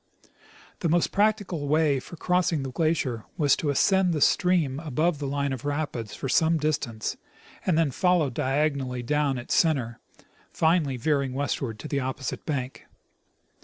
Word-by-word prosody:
The 170 - 0
most 170 +1 +2
practicable 205 -7 0
way 150 -2 +2
for 170 - -11
crossing 175 -3 +1
the 135 - -5
glacier 145 -7 -1
was 145 -4 +4
to 150 - -2
ascend 185 +5 +3
the - - 0
stream 165 -7 +2
above 155 +1 0
the 145 - -3
line 140 0 -1
of 130 - -6
rapids 145 -6 -3
for - - -4
some 160 +4 +3
distance, 145 -8 -2 0.5
and 175 -4 +3
then 160 -4 +2
follow 175 -1 +2
diagonally 135 -1 -1
down 145 0 0
its 120 - -4
center, 130 -9 +1 0.5
finally 160 -5 +1
veering 140 0 0
westward 135 -4 -2
to 155 - -8
the 140 -2 -1
opposite 130 0 -4
bank. 135 -4 -4
145 Hz, 155 wpm, -26 LUFS, 135-165 Hz, 0.5 s, was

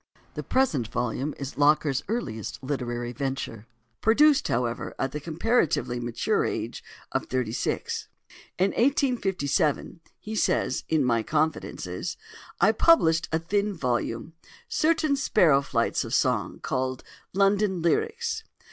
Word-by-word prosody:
The - - -4
present 175 - +1
volume 125 +5 -2
is 140 0 -6
Locker's 145 -2 +3
earliest 110 - -4
literary 120 -3 -3
venture; 130 -4 -4 0.3
produced, 285 +6 +5
however, 120 0 -2
at 135 - -1
the 150 - -4
comparatively 160 - 0
mature 120 -1 0
age - - -3 0.3
of - - -2
thirty 125 -4 -1
six. 115 - -2 0.5
"In 190 +2 +2
1857," 195 - +1 0.2
he 215 +1 -7
says - - +1
in 155 -4 +2
"My 115 -2 +2
Confidences," 155 +6 -2 0.4
"I - - +5
published 170 - +4
a 160 - +2
thin 200 +5 -1
volume—certain 165 - -1
sparrow 165 - +4
flights 120 -4 0
of - - -2
song, - - +1
called 130 0 -2 0.3
'London 195 -2 +2
Lyrics. 450 - 0
155 Hz, 120 wpm, -26 LUFS, 125-210 Hz, 0.5 s, produced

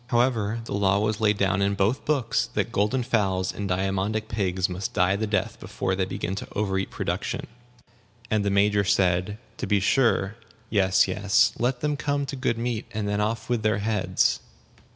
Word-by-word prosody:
However, 115 -3 +1
the - - -5
law 100 -1 +2
was 105 +1 -1
laid 105 -1 +3
down 95 0 +1
in 100 0 +1
both 105 +8 0
books 115 -5 0
that - - 0
golden 115 +4 +1
fowls 95 -6 0
and 100 -1 -4
diamondic 95 +4 -1
pigs 95 -4 0
must 95 +7 -5
die 90 +2 +3
the 110 +2 -2
death 105 -2 -1
before 95 - -3
they 95 0 0
begin 95 0 -4
to - - -5
overeat 95 -2 -1
production; - - -3 0.9
and 110 -1 +2
the 100 - +1
Major 100 +1 +3
said, 95 0 +1 0.2
"To - - -4
be 105 -1 +3
sure. 110 -1 +2 0.3
Yes, 95 -2 +3
yes. 105 +5 +2
Let 125 +1 0
them 150 -1 0
come 145 -1 -1
to 140 - -5
good 130 -3 -1
meat, 115 -1 -3
and 105 -1 -2
then 105 0 0
off 110 +1 -2
with 120 -2 0
their 110 -2 +1
heads." 105 -2 +1
105 Hz, 185 wpm, -25 LUFS, 95-115 Hz, 0.9 s, laid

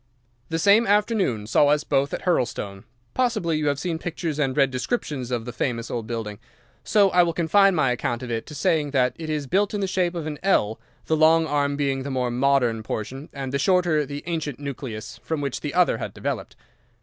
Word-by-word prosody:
"The 165 - -1
same 205 +6 +5
afternoon 205 - +1
saw 145 +6 +4
us 150 +1 +3
both 140 -1 +1
at - - -4
Hurlstone. 105 - -1 0.3
Possibly 215 -11 0
you 150 - -1
have 145 -1 +1
seen 165 +2 -3
pictures 165 -3 -4
and 135 -2 0
read 135 -2 +4
descriptions 130 - -3
of 120 -3 -2
the 120 - -6
famous 115 0 -2
old 115 -2 -3
building, 110 -3 -4 0.4
so 200 -3 +4
I 180 - +5
will 170 -1 +1
confine 190 +4 +4
my 140 -6 +2
account 120 0 -2
of 120 - -5
it 115 -1 -3
to 150 - -9
saying 155 -2 +1
that 125 -1 +3
it 160 -1 -5
is 150 -2 -2
built 200 +8 +1
in - - -1
the 195 - 0
shape 180 -2 0
of 165 -3 -4
an 150 -2 -5
L, 110 - +2 0.3
the 160 - +1
long 160 +1 +5
arm 145 -2 0
being 135 -2 0
the 140 - -5
more 125 -2 -1
modern 125 -3 +2
portion, 130 +7 -5
and 135 -2 -5
the 140 - +1
shorter 175 -2 +3
the 145 0 -6
ancient 160 -6 -3
nucleus, 130 -6 -6
from 160 -2 -3
which 140 -3 -3
the 150 - -4
other 180 -1 +3
had - - -5
developed. - - -4
145 Hz, 215 wpm, -24 LUFS, 125-170 Hz, 0.4 s, same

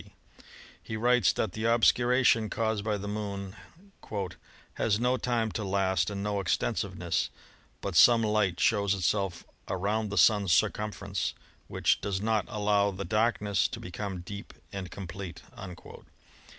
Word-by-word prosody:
d. - - -19 0.7
He 110 - -5
writes 125 +2 +4
that 110 - -1
the 110 +4 -4
obscuration 120 0 +4
caused 110 -2 -1
by 105 -1 0
the 100 +1 -6
Moon 100 -1 -4 1.2
"has 105 -1 +1
no 125 +2 +2
time 115 -3 0
to 110 - -3
last 95 -2 +1
and 100 -1 -4
no 105 -1 -1
extensiveness, 95 - -1 0.5
but 100 -3 -4
some 115 +5 +7
light 105 -5 +1
shows 100 -4 +2
itself 95 -1 -1 0.2
around 105 +3 -1
the 105 - -4
Sun's 105 -4 +4
circumference 100 -2 0 0.3
which - - +1
does 100 -2 -2
not 110 0 +1
allow 105 -2 +2
the 100 0 -5
darkness 105 -3 +1
to - - -7
become 95 0 -5
deep 100 +3 -9 0.2
and 95 -2 -5
complete." 95 -1 -8
105 Hz, 135 wpm, -29 LUFS, 100-110 Hz, 1.2 s, some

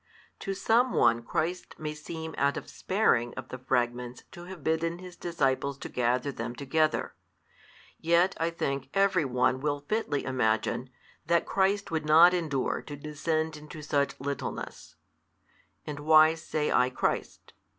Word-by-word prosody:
To 195 -1 -3
some 235 +5 +2
one 115 0 +4
Christ 170 +9 -3
may 150 -1 -4
seem 160 +1 -7
out 140 +1 +1
of - - -6
sparing 125 - +1
of - - -7
the 130 - -7
|330 130 - -29
fragments 120 0 -1
to 175 - -10
have 180 -4 -10
bidden 165 +2 0
His 180 -1 -10
disciples 140 -4 -1
to - - -7
gather 125 +3 0
them 120 -1 -5
together. 155 +4 0 0.9
Yet 170 +3 +3
(I 165 - +1
think) 140 -5 -3
every 195 -5 +3
one 125 0 +1
will 145 -1 -1
fitly 215 -10 -1
imagine, 125 0 0 0.4
that 170 0 +3
Christ 195 0 +1
would 160 -2 -2
not 165 +4 +8
endure 155 -7 -1
to 145 - -8
descend 150 +1 -3
to 155 -1 -8
such 140 -1 0
littleness: 140 +1 -5 0.9
and 145 -1 -5
why 155 +1 +6
say 155 -2 -2
I 125 +1 +4
Christ? 130 - -3
150 Hz, 150 wpm, -29 LUFS, 130-170 Hz, 0.9 s, not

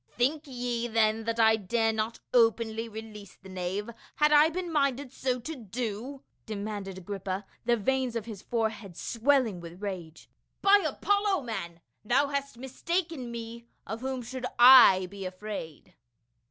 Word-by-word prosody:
" - - -41
Think 290 +5 +1
ye 245 -2 -2
then 220 -1 +1
that 230 0 -2
I 220 0 +5
dare 225 +2 0
not 220 +1 -2
openly 230 -1 +2
release 215 -2 -10
the 190 - -15
knave, 185 +3 -3 0.3
had 300 0 +3
I 300 +1 +7
been 350 +1 -4
minded 280 -3 0
so 255 -1 -1
to 320 +6 -6
do?" 240 +3 -5 0.2
demanded 205 -2 -5
Agrippa, 195 +1 -5 0.2
the 240 0 +3
veins 255 +2 0
of 225 -3 -3
his 215 -5 -8
forehead 220 -6 -3
swelling 235 -5 +1
with 170 +1 -10
rage. 175 -5 -6 0.2
" - - -50
By 400 0 +6
Apollo, 405 -5 +1
man, 175 -8 -6 0.2
thou 265 +6 +2
hast 280 -3 -3
mistaken 295 +2 -3
me; 235 0 -7 0.2
of 220 +3 -6
whom 260 -1 -3
should 250 +2 -5
I 240 -7 +9
be 195 +2 -9
afraid 185 -4 -7
230 Hz, 155 wpm, -28 LUFS, 205-265 Hz, 0.3 s, I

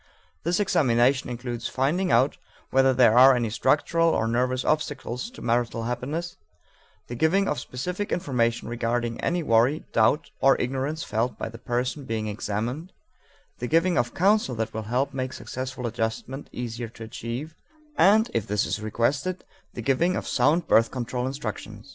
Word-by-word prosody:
This 175 +4 0
examination 135 - +2
includes 120 -1 -4
finding 170 +8 0
out 130 +5 +3 0.3
whether 135 0 +4
there 120 -3 +5
are 130 +1 +8
any 120 -3 -1
structural 165 +7 +2
or 115 -8 +1
nervous 125 +2 0
obstacles 150 - -2
to 250 - -12
marital 115 -1 0
happiness, 145 +9 -4 0.7
the - - -8
giving 165 +10 +2
of 150 - -1
specific 180 +12 -4
information 120 -9 0
regarding 120 0 -2
any 175 0 0
worry, 120 +5 +3
doubt, 115 +9 +2
or 135 - +4
ignorance 135 +6 -2
felt 115 +3 -1
by - - -4
the 115 0 -11
person 125 +3 -2
being 110 -2 -2
examined, 115 - -4 0.7
the 125 - -3
giving 165 +5 +2
of 120 -5 0
counsel 195 - +2
that 110 -1 -3
will 110 - -3
help 130 +3 0
make 130 -1 -3
successful 130 0 -6
adjustment 115 +4 -3
easier 120 -1 -5
to 115 - -11
achieve, 115 +7 -6 0.4
and, 210 +6 +4
if 115 -3 -1
this 105 0 +1
is - - -3
requested, 140 - -1 0.3
the 120 - -5
giving 165 +9 +2
of - - -4
sound 150 +7 +2
birth 115 0 +4
control 125 0 -3
instruction. 110 -6 -6
125 Hz, 160 wpm, -25 LUFS, 115-150 Hz, 0.7 s, are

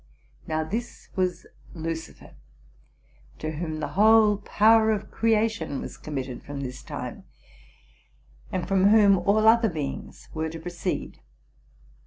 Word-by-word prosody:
Now, 155 0 -1
this 225 +9 -5
was 185 -2 -1 0.3
Lucifer, 160 0 -6 1.1
to 155 - -4
whom 155 0 -4
the 155 - -3
whole 215 0 +5
power 220 +2 +4
of 210 -2 -1
creation 225 -9 0
was - - -7
committed 135 -4 -5
from 140 -1 -7
this 130 -1 -6
time, - - -7 1.3
and 185 -2 -2
from 195 0 +3
whom 205 -2 +6
all 215 +2 +3
other 225 0 +5
be 155 -5 -3
ings 135 - -8
were 160 0 -2
to 165 +1 -7
proceed. 175 +1 -4
185 Hz, 130 wpm, -26 LUFS, 155-215 Hz, 1.3 s, whom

